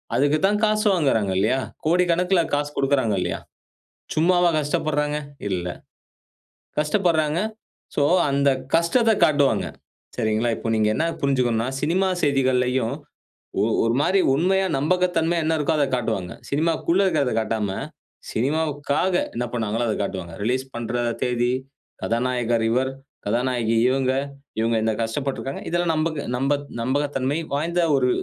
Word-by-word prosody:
அதக்கு 145 +3 +3
தான் 205 +1 +2
காசு 215 0 +2
வாங்குறாங்க 115 - +1
இல்லையா, 110 +7 +2 0.3
கோடிக்கணக்குல 180 +2 +3
காசு 145 0 +1
கொடுக்குறாங்க 135 -5 +2
இல்லையா, 90 -2 -2 0.8
சும்மாவா 175 +2 +4
கஷ்டப்படுறாங்க? 150 0 0 0.3
இல்ல. 90 -2 -2 1.1
கஷ்டப்படுறாங்க. 160 -1 +1 0.6
சோ - - +2 0.3
அந்த 140 0 +2 0.3
கஷ்டத்த 220 +8 +3
காட்டுவாங்க. 145 -2 +3 0.5
சரிங்களா, 110 0 +1
இப்ப 115 - -3
நீங்க 110 -1 +2
என்ன 160 - 0 0.2
புரிஞ்சுக்கணுனா 125 -4 +1
சினிமா 180 +5 +1
செய்திகள்லையும் 130 -3 +1 0.7
ஒ - - +3 0.2
ஒரு 115 +1 +1
மாதிரி 190 +6 +3 0.2
உண்மையா, 190 +5 +2
நம்பகத்தன்மையா 170 +1 +1
என்ன 160 0 +2
இருக்கோ 150 +2 +1
அத 145 - +3
காட்டுவாங்க. 110 -7 -2 0.2
சினிமாக்குள்ள 165 +4 +1
இருக்கிறத 145 -8 +1
காட்டாம, 110 -2 -1 0.6
சினிமாவுக்காக 150 +6 0 0.2
என்ன 120 0 -2
பண்ணாங்களோ 115 0 -1
அத 110 - 0
காட்டுவாங்க. 90 -4 -5
ரிலீஸ் 130 +3 0
பண்ற 120 +1 -3 0.3
தேதி, 120 0 +1 0.5
கதாநாயகர் 120 -1 0
இவர், 130 +3 +1 0.4
கதாநாயகி 120 0 0
இவங்க, 130 0 +1 0.5
இவங்க 115 0 +1
இந்த 110 - +1
கஷ்டப்பட்டுருக்காங்க. 135 +3 -3
இதெல்லாம் 175 -1 +1
நம்பக 155 -2 -1
நம்ப 135 +3 +1 0.3
நம்பகத்தன்மை 140 +2 0 0.2
வாய்ந்த 170 +4 0 0.2
ஒரு 125 -1 +2
140 Hz, 120 wpm, -23 LUFS, 120-160 Hz, 1.1 s, சும்மாவா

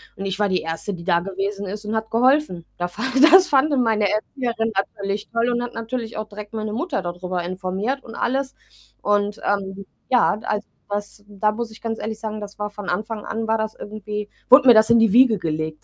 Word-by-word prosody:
und 195 - -6
ich 195 +1 -3
war 205 - +2
die 185 - +1
1., 165 +5 -4
die 170 - -10
da 170 -2 +3
gewesen 195 +2 -4
ist 210 +2 -6
und 215 +1 -2
hat 220 0 -2
geholfen. 245 - +2
Da 175 0 -1
fand 260 +9 0
das 370 +1 +8
fand 290 0 +3
dann 260 -3 +3
meine 215 -3 +2
Erzieherin 225 +1 -2
natürlich 200 +1 -2
toll 230 +1 +1
und 240 0 0
hat 245 0 -5
natürlich 230 0 -4
auch 215 0 -4
direkt 210 0 -10
meine 215 -1 -3
Mutter 250 - -2
da 175 - -2
drüber 180 0 -4
informiert 190 +9 -3
und 230 -1 -10
alles. 265 +2 -1 0.5
Und, 205 0 +1
ähm, 195 -1 -2 0.2
ja, 245 -4 +3
als 210 -2 -2 0.2
was 205 0 -5
da 210 +1 0
muss 230 +2 -4
ich 220 - -14
ganz 225 -1 -3
ehrlich 220 0 -4
sagen, 215 -1 -5
das 205 -1 -8
war 210 0 -4
von 205 -2 -7
Anfang 210 +3 -3
an 225 0 -3
war 225 0 +1
das 220 0 -3
irgendwie 210 0 -6 0.2
wurde 260 +1 +8
mir 245 - +10
das 220 0 +5
in 235 - +6
die 225 -3 +4
Wiege 245 -3 +6
gelegt, 155 -2 -3
215 Hz, 225 wpm, -22 LUFS, 195-230 Hz, 0.5 s, mir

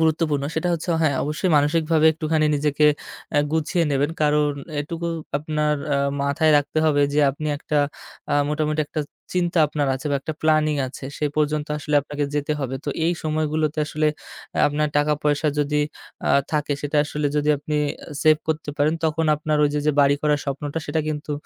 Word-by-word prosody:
গুরুত্বপূর্ণ 155 -3 +1
সেটা 175 +2 0
হচ্ছে 170 +1 -3
হ্যাঁ, 145 -4 +2
অবশ্যই 155 +5 -1
মানসিকভাবে 155 +2 +3
একটুখানি 155 -1 0
নিজেকে 150 +1 +2 0.5
অ্যা 145 - +4
গুছিয়ে 160 +2 +1
নেবেন। 145 +2 +1
কারণ 150 0 +3 0.3
এটুকু 165 +3 -4 0.3
আপনার 150 0 0 0.2
আ - - +2 0.2
মাথায় 150 +3 +2
রাখতে 145 +2 0
হবে 145 -2 +3
যে 150 - +3
আপনি 155 +3 -6
একটা 150 -1 -1 0.5
আ - - +3
মোটামুটি 155 0 0
একটা 155 - -2 0.3
চিন্তা 175 -1 +1
আপনার 145 -1 -1
আছে 135 +3 -6
বা 140 - +2
একটা 155 - -4
প্ল্যানিং 155 -1 +3
আছে, 130 - -9
সে 150 - -2
পর্যন্ত 150 0 +1
আসলে 150 0 -3
আপনাকে 145 +1 -3
যেতে 145 +1 0
হবে। 135 0 -2
তো - - -4 0.2
এই 170 - +3
সময়গুলোতে 155 0 -1
আসলে 155 0 +1 0.4
অ্যা - - -1
আপনার 150 +1 0
টাকা-পয়সা 150 0 +1
যদি 150 0 +1 0.5
আ - - +3 0.2
থাকে 150 -1 0
সেটা 145 +1 -2
আসলে 150 0 -2
যদি 150 0 +1
আপনি 150 +1 -3 0.5
সেভ 155 -1 +6
করতে 155 -1 -1
পারেন 150 +2 +2
তখন 160 0 +1
আপনার 150 0 -1
ওইযে, 145 0 0
যে 150 - +4
বাড়ি 140 0 +4
করার 150 -1 +2
স্বপ্নটা 145 +2 -3
সেটা 160 - 0
কিন্তু 150 0 -3
150 Hz, 175 wpm, -23 LUFS, 145-155 Hz, 0.5 s, সেভ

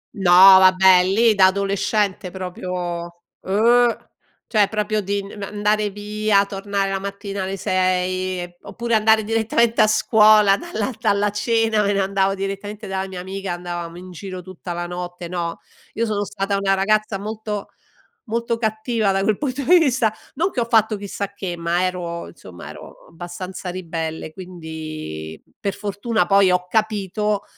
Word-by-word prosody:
No 190 -3 +1 0.3
vabbè, 185 -1 +6
lì 220 +4 +3
da 190 -2 +6
adolescente 200 0 0
proprio 185 0 -6 0.7
oh, 235 +4 +2 0.4
cioè 210 -3 +2
proprio 215 0 -1
di 200 +1 -2
n 200 +1 -10
andare 210 +1 0
via, 205 0 +1
tornare 195 0 -2
la 195 - -1
mattina 200 0 -5
alle 190 +1 -4
6 185 0 0
e 175 0 -9
p - - -45
oppure 235 0 -4
andare 220 0 +4
direttamente 225 +1 +1
a 215 - +5
scuola 215 -2 +5
dalla 215 +4 -3
dalla 205 -2 +1
cena, 225 +1 +1
me 205 0 +1
ne 200 - 0
andavo 195 0 +1
direttamente 200 +2 -5
dalla 190 -1 -3
mia 185 -2 -7
amica, 190 0 -5
andavamo 175 -1 -6
in 185 +1 -10
giro 185 +1 -8
tutta 185 0 -9
la 175 0 -4
notte, 175 0 -6
no, 170 -1 -4 0.3
io 230 - -1
sono 210 -2 -1
stata 200 0 -2
una 195 0 +2
ragazza 215 +1 +1
molto 210 0 -5 0.5
molto 235 0 -2
cattiva 220 -1 0
da 195 - 0
quel 210 0 +1
punto 275 -1 -3
di 360 +7 +6
vista 255 -9 +2 0.2
non 340 +7 0
che 270 - -4
ho 235 - +1
fatto 220 -2 +2
chissà 200 0 -5
che, 190 -3 -5
ma 170 +1 0
ero 175 -2 -3
insomma 90 - -12
ero - - -11
abbastanza 175 +3 -7
ribelle 165 -3 -5
quindi, 155 - -7 0.2
per 200 -1 -3
fortuna 210 +2 -1
poi 195 -1 +4
ho 180 0 +1
capito, 210 0 -1
200 Hz, 160 wpm, -21 LUFS, 185-215 Hz, 0.7 s, vabbè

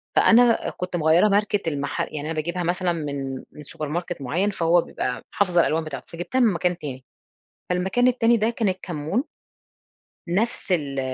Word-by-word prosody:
فأنا 235 0 +5
كنت 180 0 -5
مغيّرة 165 +4 +4
ماركة 205 -3 +1
المحل 145 -2 -2
يعني 150 - -4
أنا - - -3
باجيبها 170 +3 -2
مثلًا 175 +1 0
من 140 -4 -4
من 150 - -11
سوبر 150 +1 -6
ماركت 175 +1 -3
معين 170 +10 0
فهو 175 -2 +3
بيبقى 125 -5 -4
حافظة 180 -4 +3
الألوان 160 0 +1
بتاعته، 140 -4 -7
فجبتها 175 +10 -3
من 230 -5 +4
مكان 175 +1 0
تاني، 130 -6 -7 0.6
فالمكان 190 +7 +2
التاني 240 -2 +3
ده 220 +1 +1
كان 225 -3 0
الكمون، 180 - -2 1.1
نفس 210 +2 -1
ال 145 -6 0
175 Hz, 160 wpm, -24 LUFS, 150-200 Hz, 1.1 s, فأنا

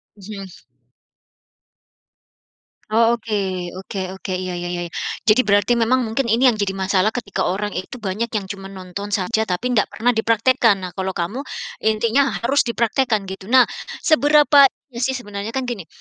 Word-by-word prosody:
Mhm. 200 -1 -8 2.4
Oh, 230 +1 +4
oke 225 -2 -3 0.4
oke 190 +1 -6 0.2
oke. 190 - -5
Iya, 185 -1 -3
ya 175 0 -4
ya 175 - -3
ya. - - -39 0.4
Jadi 220 +3 +6
berarti 205 +3 +3
memang 250 +3 +2
mungkin 235 +3 -1
ini 250 +3 +5
yang 230 - 0
jadi 200 -2 -1
masalah 190 +2 +1
ketika 220 -6 -2
orang 205 +3 -1
itu 230 +6 -6
banyak 210 +4 -2
yang 210 -3 -1
cuman 195 -1 -7
nonton 190 +2 -7
saja, 220 +3 0
tapi 185 +7 -2
nggak 210 - +3
pernah 220 +4 0
dipraktekkan. 230 0 +3
Nah, 180 - -5
kalau 190 0 -2
kamu 180 +9 -3 0.5
intinya 230 +5 +2
harus 265 +3 +2
dipraktekkan 235 -1 +1
gitu. 190 0 -8
Nah, 260 -1 +8 0.4
seberapa 295 -2 +6 0.3
iya 235 - -7
sih, 265 +1 0
sebenarnya 205 -1 -6
kan 265 - 0
gini, 230 -10 -5
215 Hz, 160 wpm, -20 LUFS, 195-245 Hz, 2.4 s, Nah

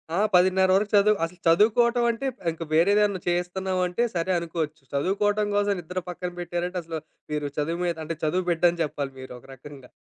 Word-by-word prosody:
ఆ! - - 0 0.2
10:30 185 +1 +4
వరకు 205 +2 +1
చదువు 205 +1 +5
అసల 170 +2 -4
చదువుకోవటం 235 +7 +4
అంటే 230 +4 -6 0.3
ఇంక 165 +1 -7
వేరే 170 +5 +4
దేదన్నా 200 -3 +1
చేయస్తన్నాామంటే 180 +3 0
సరే 170 +2 0
అనుకోవచ్చు. 160 -3 -4
చదువుకోటం 205 +7 +1
కోసం 205 0 +2
నిద్ర 180 +2 -5
పక్కన 180 0 -5
పెట్టారంటే, 175 +1 -3
అసల 160 -1 -5 0.3
మీరు 150 -1 -1
చదువు 165 +4 -1
మీద 170 -1 0
అంటే 165 +1 -4
చదువు 180 +4 0
బిడ్డని 170 +1 +2
జెప్పాలి 140 -2 -4
మీరొక 125 -2 -10
రకంగా. 135 -1 -13
175 Hz, 165 wpm, -25 LUFS, 165-195 Hz, 0.3 s, చదువు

